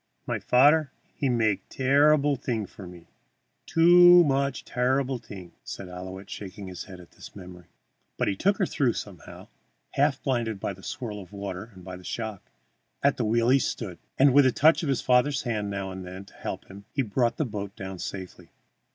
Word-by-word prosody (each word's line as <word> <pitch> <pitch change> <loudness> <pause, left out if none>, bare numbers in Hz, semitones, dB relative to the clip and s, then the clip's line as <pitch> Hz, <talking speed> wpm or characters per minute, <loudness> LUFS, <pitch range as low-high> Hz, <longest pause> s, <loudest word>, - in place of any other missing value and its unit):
"My - - -2
fadder 145 +4 +4 0.2
he 140 - -1
make 110 -5 0
terreeble 145 +2 +3
thing 120 -4 -3
for 95 0 -11
me 90 -1 -12 0.6
too 175 +1 +7
much 140 -2 0
terreeble 130 +1 0
thing," 95 -6 -11
said 95 - -7
Ouillette, 95 +2 -8
shaking 100 0 -8
his 90 -2 -7
head 95 -3 -11
at 90 - -15
the - - -12
memory. 90 -3 -11 0.5
But - - 0
he 100 - 0
took 200 - +1
her 195 - +2
through 130 -8 +1
somehow, 95 -7 -9 0.4
half 140 -1 +1
blinded 115 -6 -1
by 100 - -3
the 95 - -15
swirl 110 -1 -5
of 90 -1 -14
water 100 0 -6
and 90 -1 -13
the 90 -1 -8
shock. 110 -1 -5 0.5
At 140 0 +3
the 120 - 0
wheel 115 +2 +2
he 135 +2 +5
stood, 95 -9 -4 0.2
and 135 -1 +5
with 140 -1 +6
a - - +3
touch 155 +5 +4
of 155 - -2
his 135 - +1
father's 125 +2 +2
hand 105 -4 -2
now 100 -1 -4
and 95 0 -7
then 95 +2 -9
to - - -19
help - - -6
him, 100 +1 -13
he 135 - +2
brought 120 +1 0
the 155 - 0
boat 100 -4 -6
down 95 -2 -7
safely. 95 0 -7
115 Hz, 195 wpm, -26 LUFS, 95-135 Hz, 0.6 s, too